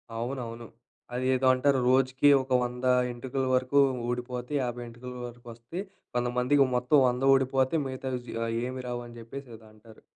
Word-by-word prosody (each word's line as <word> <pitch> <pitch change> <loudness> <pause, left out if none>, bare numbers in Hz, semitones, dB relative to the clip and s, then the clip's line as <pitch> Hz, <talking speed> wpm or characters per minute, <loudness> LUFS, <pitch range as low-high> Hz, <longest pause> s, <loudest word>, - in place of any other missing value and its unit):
అవునవును. 120 -1 -5 0.5
అదేదో 130 +1 +1
అంటారు. 135 +1 +2
రోజుకి 130 +2 +4
ఒక 130 - -15
100 125 +1 -4 0.3
ఎంటుకల 130 +2 -3
వరకు 130 +2 +2 0.3
ఊడిపోతే, 125 +1 -4
50 120 0 -4
ఎంటుకల 120 +2 -9
వరకు 120 +1 -13
వస్తే, 120 +10 -8 0.4
కొంతమందికి 125 +3 +2
మొత్తం 125 +4 +4
100 125 +2 -3
ఓడిపోతే 135 +3 +2
మిగతావి 130 -1 -4
జి - - -7 0.3
ఏమీ 130 0 -6
రావు 120 0 -3
అని 120 0 -12
జెప్పేసి 125 +3 -9
ఏదో 110 0 -16
అంటారు. 110 +1 -17
125 Hz, 150 wpm, -28 LUFS, 120-130 Hz, 0.5 s, రోజుకి